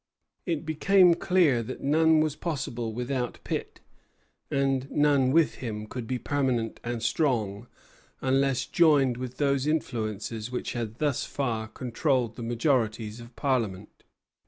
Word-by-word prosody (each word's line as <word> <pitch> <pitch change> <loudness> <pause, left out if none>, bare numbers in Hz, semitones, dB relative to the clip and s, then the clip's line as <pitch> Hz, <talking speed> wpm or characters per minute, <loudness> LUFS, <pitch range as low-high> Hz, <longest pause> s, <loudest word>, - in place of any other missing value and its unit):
It 165 -2 -1
became 180 +3 +5
clear 165 -8 +3
that 125 +3 -7
none 160 +2 +4
was 155 -2 0
possible 130 -9 -3
without 125 +1 -3
Pitt; - - -4 0.7
and 135 -1 0
none 140 -3 +3
with 165 +1 +3
him 105 -4 -4
could 115 +1 -6
be 130 - -1
permanent 125 -4 -1
and 120 -1 -3
strong 120 -6 0 0.5
unless 135 0 +1
joined 145 -7 +3
with 125 0 -6
those 140 -1 +1
influences 115 -6 -2
which 125 - -3
had 115 -3 -4
thus 145 0 0
far 115 -6 -2
controlled 125 0 -1
the - - -8
majorities 115 -2 0
of 120 0 -12
Parliament. 110 -8 -2
130 Hz, 135 wpm, -27 LUFS, 115-145 Hz, 0.7 s, became